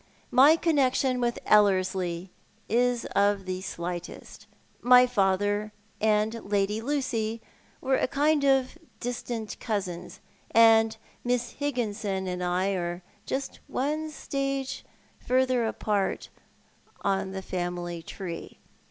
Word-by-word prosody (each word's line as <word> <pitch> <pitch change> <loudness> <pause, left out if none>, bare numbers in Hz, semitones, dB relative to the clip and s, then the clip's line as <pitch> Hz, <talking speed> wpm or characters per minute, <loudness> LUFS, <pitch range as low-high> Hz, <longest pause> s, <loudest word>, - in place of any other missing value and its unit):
My 285 +5 +7
connection 265 -6 +2
with 240 -1 0
EUerslie 185 -3 +2 0.4
is 245 +1 +1
of 200 -1 +2
the 185 0 -3
slightest. 175 -2 -6 0.3
My 250 0 +7
father 205 -2 +1 0.3
and 215 +1 +1
Lady 205 +1 0
Lucy 230 -4 -1 0.4
were 265 0 +2
a - - +1
kind 290 +2 +2
of 270 +2 +2 0.2
distant 235 -2 -4
cousins, 185 -5 -4 0.3
and 225 -1 +5 0.3
Miss 245 -1 0
Higginson 210 -9 -2
and 180 0 -3
I 180 +2 +1
are 175 -2 -3 0.2
just 275 +1 -3
one 305 +4 -2
stage 275 -3 -3 0.4
farther 255 -2 +2
apart 205 -3 -1 0.7
on 195 -1 0
the 190 0 -6
family 175 -2 -4
tree. 170 0 -7
220 Hz, 110 wpm, -27 LUFS, 190-255 Hz, 0.7 s, My